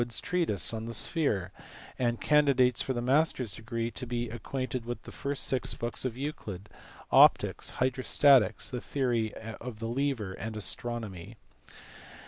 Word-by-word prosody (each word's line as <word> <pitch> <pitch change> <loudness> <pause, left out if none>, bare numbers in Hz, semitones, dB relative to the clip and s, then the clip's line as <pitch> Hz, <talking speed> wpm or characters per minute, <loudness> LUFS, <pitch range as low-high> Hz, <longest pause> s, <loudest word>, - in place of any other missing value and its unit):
185 120 -1 -2
treatise 165 - 0
on 110 0 -4
the 115 0 -5
sphere, 105 - +1 0.5
and 120 -2 0
candidates 135 -5 +3
for - - -2
the 120 -2 -2
master 135 +1 +3
s 110 -4 -3
degree 115 +1 -4
to 125 +3 -6
be 120 0 -2
acquainted 130 +2 -4
with 120 -1 -6
the - - -10
first 140 -1 -3
six 130 -2 0
books 120 +2 -3
of 125 -2 -3
Euclid, 105 -9 -6 0.4
optics, - - +5
hydrostatics, 130 -2 +3
the 125 -2 -4
theory 120 -6 0
of 115 +1 -8
the 115 +1 -4
lever, 120 -5 -1
and 110 +3 -6
astronomy. 110 -3 -3
120 Hz, 150 wpm, -29 LUFS, 110-130 Hz, 0.5 s, optics